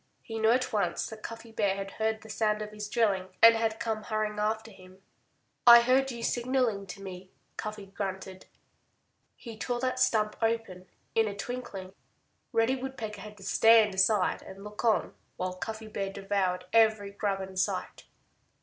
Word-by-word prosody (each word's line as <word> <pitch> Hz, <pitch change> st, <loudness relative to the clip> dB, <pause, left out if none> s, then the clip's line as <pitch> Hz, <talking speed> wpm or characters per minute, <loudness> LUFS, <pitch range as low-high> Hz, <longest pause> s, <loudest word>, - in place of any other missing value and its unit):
He 225 Hz, -1 st, -5 dB
knew 220 Hz, 0 st, +3 dB
at 250 Hz, +1 st, +2 dB
once 200 Hz, -5 st, 0 dB
that 220 Hz, -1 st, -9 dB
Cuffy 230 Hz, 0 st, -8 dB
Bear 205 Hz, -3 st, +1 dB
had 195 Hz, 0 st, -5 dB
heard 220 Hz, 0 st, -1 dB
the 220 Hz, -, -13 dB
sound 215 Hz, 0 st, 0 dB
of 210 Hz, -, -8 dB
his 210 Hz, -1 st, -6 dB
drilling 205 Hz, -5 st, +1 dB
and 230 Hz, 0 st, +9 dB
had 225 Hz, 0 st, -1 dB
come 225 Hz, -2 st, -2 dB
hurrying 215 Hz, -1 st, -2 dB
after 220 Hz, +1 st, -1 dB
him. 185 Hz, 0 st, -17 dB, 0.6 s
"I 235 Hz, 0 st, +11 dB
heard 260 Hz, +3 st, +3 dB
you 235 Hz, -2 st, -6 dB
signaling 240 Hz, -5 st, 0 dB
to 195 Hz, +2 st, -9 dB
me," 185 Hz, -1 st, -8 dB, 0.3 s
Cuffy 215 Hz, -2 st, -6 dB
grunted. 190 Hz, -1 st, -6 dB, 0.9 s
He 230 Hz, -3 st, -10 dB
tore 240 Hz, +2 st, -2 dB
that 255 Hz, 0 st, -1 dB
stump 215 Hz, -3 st, +2 dB
open 225 Hz, -5 st, -1 dB, 0.3 s
in 225 Hz, -1 st, +3 dB
a 200 Hz, -, -4 dB
twinkling. 200 Hz, -5 st, -6 dB, 0.6 s
Reddy 230 Hz, +2 st, +2 dB
Woodpecker 230 Hz, -6 st, -6 dB
had 210 Hz, 0 st, -10 dB
to 195 Hz, -, -13 dB
stand 220 Hz, +1 st, +5 dB
aside 190 Hz, 0 st, +2 dB
and 195 Hz, +1 st, -11 dB
look 210 Hz, 0 st, -8 dB
on 225 Hz, -2 st, +2 dB, 0.2 s
while 185 Hz, 0 st, -2 dB
Cuffy 220 Hz, +4 st, -6 dB
Bear 195 Hz, -2 st, -3 dB
devoured 195 Hz, -2 st, -1 dB
every 220 Hz, -3 st, +4 dB
grub 200 Hz, -1 st, -1 dB
in 190 Hz, 0 st, -8 dB
sight. 185 Hz, -, -2 dB
215 Hz, 170 wpm, -29 LUFS, 195-225 Hz, 0.9 s, I